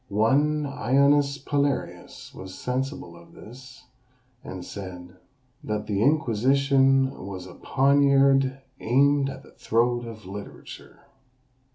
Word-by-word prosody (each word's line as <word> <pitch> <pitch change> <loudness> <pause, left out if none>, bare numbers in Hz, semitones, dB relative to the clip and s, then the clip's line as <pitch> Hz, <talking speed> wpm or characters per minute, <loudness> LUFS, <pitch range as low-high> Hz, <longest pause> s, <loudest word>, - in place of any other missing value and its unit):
One 145 +9 +2
Aonius 140 +1 +2
Palearius 140 0 -3
was 95 0 -10
sensible 125 - -4
of 85 0 -17
this; 125 +4 -14 0.6
and 90 -1 -8
said, 90 -2 -9 0.5
"that 105 0 -3
the 100 -1 -2
Inquisition 135 +1 +2 0.2
was 95 -2 -7
a 95 - -11
poniard 135 -1 +2 0.2
aimed 140 +3 +2
at 135 0 -9
the - - -18
throat 120 +1 0
of 110 -3 -10
literature." 100 +2 -10
130 Hz, 105 wpm, -25 LUFS, 105-140 Hz, 0.6 s, One